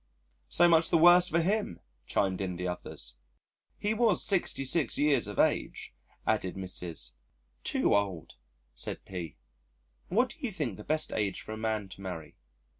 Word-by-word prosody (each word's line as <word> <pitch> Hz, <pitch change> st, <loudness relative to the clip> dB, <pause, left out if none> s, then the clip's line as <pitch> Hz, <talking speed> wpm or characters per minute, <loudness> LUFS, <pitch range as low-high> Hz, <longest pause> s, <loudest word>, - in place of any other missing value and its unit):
"So 175 Hz, -, +5 dB
much 165 Hz, -1 st, +5 dB
the -, -, +4 dB
worse 175 Hz, +2 st, +7 dB
for 170 Hz, -1 st, +2 dB
him," 205 Hz, +5 st, -1 dB, 0.3 s
chimed 95 Hz, -1 st, 0 dB
in 90 Hz, -2 st, -2 dB
the 90 Hz, +1 st, -3 dB
others. 65 Hz, -8 st, -5 dB, 0.6 s
"He 210 Hz, +1 st, 0 dB
was 220 Hz, -4 st, +3 dB
66 155 Hz, -, +2 dB
years 145 Hz, -7 st, +2 dB
of 105 Hz, -, -7 dB
age," -, -, 0 dB, 0.3 s
added 95 Hz, -, 0 dB
Mrs.. 90 Hz, -9 st, -4 dB, 0.5 s
"Too -, -, +2 dB
old," 100 Hz, -5 st, -1 dB, 0.4 s
said -, -, -6 dB
P. 90 Hz, -4 st, -6 dB, 0.7 s
"What 240 Hz, +7 st, +2 dB
do -, -, -8 dB
you 255 Hz, -7 st, -2 dB
think 150 Hz, -, -3 dB
the 105 Hz, -, -9 dB
best 155 Hz, +4 st, 0 dB
age 105 Hz, -2 st, -1 dB
for -, -, -9 dB
a -, -, -3 dB
man 110 Hz, -2 st, -2 dB
to 95 Hz, -, -11 dB
marry?" 90 Hz, -5 st, -7 dB
110 Hz, 160 wpm, -30 LUFS, -, 0.7 s, worse